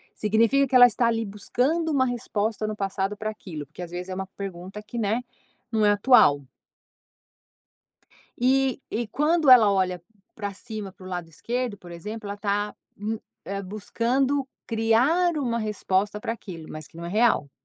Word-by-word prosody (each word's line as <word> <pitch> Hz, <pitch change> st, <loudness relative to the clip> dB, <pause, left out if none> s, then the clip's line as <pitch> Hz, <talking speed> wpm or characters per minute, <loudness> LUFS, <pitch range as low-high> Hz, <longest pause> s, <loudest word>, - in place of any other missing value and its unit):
Significa 230 Hz, +6 st, +3 dB
que 255 Hz, -, -1 dB
ela 245 Hz, -1 st, +10 dB
está 235 Hz, 0 st, +1 dB
ali 225 Hz, -1 st, 0 dB
buscando 270 Hz, +11 st, 0 dB
uma 260 Hz, -3 st, +3 dB
resposta 220 Hz, -3 st, -2 dB
no 215 Hz, -, -3 dB
passado 195 Hz, 0 st, -2 dB
para 215 Hz, 0 st, -3 dB
aquilo, 160 Hz, -8 st, -8 dB
porque 160 Hz, +5 st, -12 dB
às 175 Hz, -, -6 dB
vezes 180 Hz, +1 st, -5 dB
é -, -, -3 dB
uma 190 Hz, 0 st, -4 dB
pergunta 195 Hz, +1 st, -6 dB
que 235 Hz, +3 st, -8 dB
né, 220 Hz, +3 st, 0 dB, 0.5 s
não 220 Hz, -1 st, +1 dB
é 205 Hz, -, +6 dB
atual. 205 Hz, -, +5 dB, 2.0 s
E 265 Hz, +1 st, +2 dB
e 230 Hz, 0 st, -2 dB
quando 300 Hz, +5 st, +2 dB
ela 225 Hz, -5 st, +8 dB
olha 185 Hz, -2 st, 0 dB, 0.3 s
pra 205 Hz, -2 st, -4 dB
cima 210 Hz, -1 st, -7 dB
pro 185 Hz, -, -15 dB
lado 175 Hz, -3 st, -5 dB
esquerdo 235 Hz, -, -3 dB
por 175 Hz, -1 st, -13 dB
exemplo 210 Hz, +5 st, -7 dB
ela 200 Hz, 0 st, -5 dB
tá 205 Hz, 0 st, -1 dB, 0.2 s
u 220 Hz, +1 st, -3 dB, 0.5 s
buscando 255 Hz, +7 st, 0 dB, 0.2 s
criar 255 Hz, +10 st, +2 dB
uma 235 Hz, -4 st, 0 dB
resposta 210 Hz, -1 st, -1 dB
pra 225 Hz, -, -3 dB
aquilo, 175 Hz, -8 st, -8 dB
mas 155 Hz, -1 st, -8 dB
que -, -, -24 dB
não 170 Hz, 0 st, -7 dB
é -, -, -4 dB
real. 215 Hz, -8 st, +2 dB
215 Hz, 165 wpm, -25 LUFS, 195-245 Hz, 2.0 s, ela